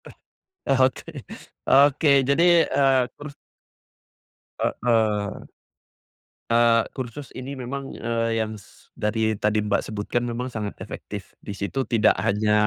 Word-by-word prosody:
Eh - - -11 0.5
eh 135 -2 +2
Oke. 130 0 +1 0.6
Oke, 140 +2 +5
jadi, 140 +5 +2 0.3
eee, 135 -2 +3 0.2
terus 145 -1 -9 1.3
Heeh. 110 -4 +1 1.2
Eee, 115 -1 +4
kursus 130 +2 -7
ini 135 +2 -7
memang, 135 +2 -5
eee, 115 0 -1
yang 110 -1 -8
s 100 - -22
dari 110 -1 0
tadi 105 0 +1
Mbak 105 -1 +1
sebutkan 110 +3 -3
memang 125 +2 -4
sangat 105 -3 -4
efektif, - - -8
di 100 - -7
situ 115 +7 -3
tidak 110 -3 +4
hanya 105 +1 +1
115 Hz, 125 wpm, -24 LUFS, 110-130 Hz, 1.3 s, Oke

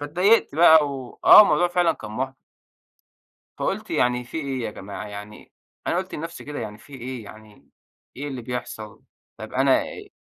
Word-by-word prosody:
فاتضايقت 180 +7 +2
بقى 160 -2 +6
و 130 -3 -8
آه - - +11
الموضوع 175 -3 +2
فعلًا 175 -2 +2
كان 105 - -10
مُحبِط. 130 +4 -4 1.2
فقُلت - - -3
يعني 125 0 +1
في 120 - -7
إيه 140 -4 -3
يا 110 - -4
جماعة؟ 100 +2 -8
يعني، 105 +1 -10 0.4
أنا - - +1
قُلت 185 +1 -4
لنَفسي 165 +3 -7
كده 145 0 -6
يعني 105 -2 -6
في 140 - -18
إيه؟ 130 -2 -7
يعني، 110 0 -15 0.5
إيه 145 +3 -5
اللي 130 -3 -6
بيحصل؟ 115 -3 -7 0.3
طَب 110 +2 -9
أنا 135 0 +3
إي - - -10
130 Hz, 170 wpm, -23 LUFS, 110-155 Hz, 1.2 s, آه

